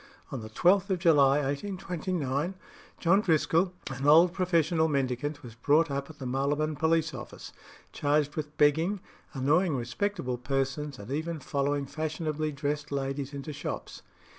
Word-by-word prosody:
On 130 - -4
the 110 - -8
12th 185 - +3
of 190 - +1
July 145 -5 +4
1829 170 0 -2 0.4
John 190 +4 +4
Driscoll, 165 0 +2 0.2
an 135 +2 -3
old 165 +4 +7
professional 170 -3 +2
mendicant, 140 0 -1
was 120 -3 -9
brought 145 +6 +2
up 140 +1 -3
at 155 - -12
the 135 - -7
Marylebone 145 +4 0
Police 160 +1 +1
office, - - -9 0.4
charged 145 0 +1
with 150 -1 -5
begging, 160 +7 +3 0.4
annoying 150 +5 +2
respectable 125 - -2
persons, 135 +2 -2
and 100 +5 -9
even 160 +3 -2
following 140 +1 -1
fashionably 155 +1 -3
dressed 145 +1 -3
ladies 135 0 -2
into 140 +1 -6
shops. 145 - -6
150 Hz, 140 wpm, -29 LUFS, 140-165 Hz, 0.4 s, old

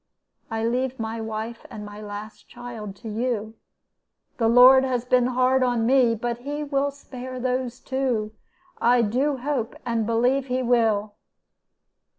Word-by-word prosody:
I 225 -1 -2
leave 255 +2 -1
my 225 0 -3
wife 220 +1 -5
and 210 -1 -8
my 205 +1 -9
last 210 +1 -9
child 235 -5 -8
to 225 +3 -11
you. 220 -1 -2 0.8
The 230 - +2
Lord 250 +3 +8
has 250 -2 -1
been 250 0 +3
hard 255 +1 +2
on 245 -3 +1
me, 245 -2 +4
but 235 +1 -3
He 290 +4 -4
will 280 -1 0
spare 260 -2 -9
me 255 - -5
those 255 -1 -2
two. 250 -5 -2 0.5
I 240 0 +4
do 265 +6 0
hope 255 -3 -2
and 230 -2 -1
believe 250 +4 +1
He 255 0 -1
will.' 220 -4 +2
245 Hz, 155 wpm, -24 LUFS, 225-255 Hz, 0.8 s, Lord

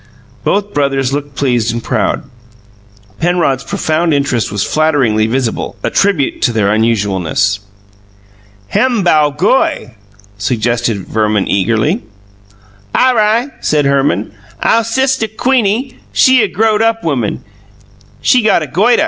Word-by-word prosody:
Both 205 0 -1
brothers 135 -2 0
looked 145 -1 -4
pleased 120 -5 0
and 115 0 -4
proud. - - -1 1.0
Penrod's 165 -7 +1
profound 160 +1 -1
interest 130 -6 -1
was 100 -1 -1
flatteringly 135 -9 +1
visible, 120 0 -2
a - - -1
tribute 185 -9 +1
to 125 - +3
their 105 -3 +1
unusualness. 100 -3 0 1.1
"Hem 245 -6 +1
bow 155 -4 +3
goy," 205 - 0 0.5
suggested 120 0 0
Verman 105 -2 0
eagerly. 110 +3 +1 0.9
"Aw 255 - +4
ri'," 230 +3 +1
said 150 -2 +1
Herman. 135 -9 +1 0.3
"Ow 230 - +3
sistuh 260 +1 0
Queenie, 250 0 0
she 260 -1 +4
a 210 - +2
growed 215 +2 +1
up 225 0 +1
woman; 135 -10 -2 0.8
she 250 - +4
got 215 -7 +2
a - - -5
goituh." 210 - +2
145 Hz, 125 wpm, -14 LUFS, -, 1.1 s, Aw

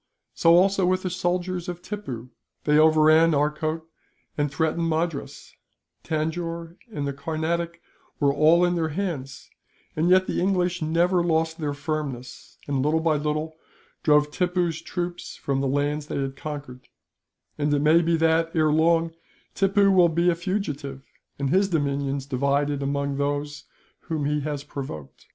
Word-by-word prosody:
"So 165 0 +5
also 190 +1 +4
with 185 0 +1
the 185 - -2
soldiers 180 0 -2
of 175 0 -6
Tippoo. 130 - -6 0.3
They 150 0 +4
overran 155 +1 +5
Arcot 155 +2 -1 0.5
and 145 -1 -1
threatened 160 +3 0
Madras; 160 -2 -3 0.5
Tanjore 165 +1 -3 0.2
and 145 -9 -3
the 140 - -2
Carnatic 165 +4 -3 0.4
were 140 -2 +3
all 160 +4 +5
in 175 - +1
their 165 -2 0
hands; 155 -6 -5 0.4
and 160 +3 +1
yet 185 +1 +5
the - - -2
English 180 -1 +1
never 170 +3 +2
lost 160 0 0
their 145 -2 -2
firmness 140 -5 -5
and, 140 -2 0
little 150 +3 +2
by 160 -1 +2
little, 150 +2 -2 0.5
drove 150 -1 +3
Tippoo's 180 -2 0
troops 175 -1 -5
from 135 -1 -2
the 135 - 0
lands 145 +2 -1
they - - -3
had 135 -1 -3
conquered; 140 -3 -8 0.7
and 145 0 +1
it 145 - +3
may 155 +3 +5
be 165 0 +1
that, 165 +1 +2
ere 155 -1 +3
long, 165 +1 +3 0.4
Tippoo 195 0 +3
will 180 -2 +5
be 170 +2 +2
a - - -1
fugitive, 150 -7 -4 0.3
and 140 -1 -1
his 195 +2 +3
dominions 140 -4 -1
divided 140 +1 0
among 140 0 -1
those 145 +1 -2 0.4
whom 155 -3 -2
he 150 +1 +1
has 145 -1 -4
provoked. 130 - -8
155 Hz, 155 wpm, -25 LUFS, 145-170 Hz, 0.7 s, So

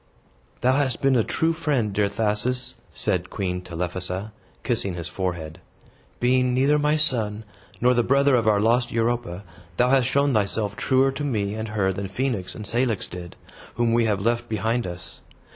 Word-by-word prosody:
"Thou 130 +2 +3
hast 135 -4 0
been 135 -1 +4
a 115 - +4
true 160 +8 0
friend, 140 -10 0
dear 100 0 +2
Thasus," 110 +4 -1 0.2
said - - 0
Queen 90 -2 -3
Telephassa, 90 +3 -4 0.3
kissing 105 -7 -1
his 85 -2 -5
forehead. 85 -4 -4 0.6
"Being 125 0 +2
neither 140 +3 +3
my 150 +1 +2
son, 110 -7 +1 0.4
nor 125 +1 +4
the 120 - +3
brother 140 +3 +3
of 115 -3 +1
our 105 -1 +4
lost 120 +3 +2
Europa, 115 -5 -1 0.3
thou 125 +1 +3
hast 130 -3 +4
shown 140 +1 +2
thyself 105 -1 0
truer 135 +3 +2
to 145 - -5
me 105 -8 -1
and 110 +1 -4
her 100 -3 0
than 100 +1 -4
Phoenix 100 -3 -2
and 105 - -7
Cilix 120 -3 0
did, 85 -1 -9 0.4
whom 120 -1 +1
we 115 0 +3
have 105 -2 +1
left 120 +3 0
behind 110 +1 0
us. 90 0 -9
115 Hz, 175 wpm, -24 LUFS, 100-125 Hz, 0.6 s, been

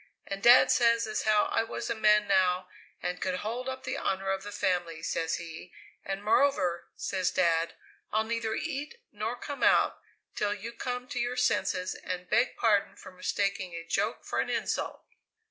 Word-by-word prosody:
And 195 0 -5
Dad 240 +3 +8
says 230 -1 +4
as 215 -1 -2
how 215 -1 +4
I - - +3
was 225 - -4
a - - 0
man 210 -1 +4
now 185 -2 +2 0.4
and 180 0 -3
could 185 -1 -1
hold 245 +4 -3
up 260 0 -6
the 255 - -3
honour 195 0 -1
of 195 0 -1
the 205 - -7
family, 175 -5 -1
says 165 -1 -1
he, 170 +1 -8 0.3
and 195 +1 -4
moreover, 210 -7 +2
says 185 -2 -1
Dad, 170 -2 +1 0.4
'I'll 215 +1 +2
neither 225 0 -2
eat 300 - -4
nor - - -3
come - - -7
out - - +4 0.4
till 205 0 0
you 225 +3 -7
come 245 +1 -4
to 245 - -3
your 245 +1 -1
senses 185 -6 +1
and 180 0 -6
beg 240 +7 +2
pardon 205 -3 +2
for - - -12
mistaking 185 -1 -2
a 165 - -5
joke 165 - -1
for - - -2
an - - 0
insult!'" - - -2
205 Hz, 180 wpm, -29 LUFS, 180-230 Hz, 0.4 s, Dad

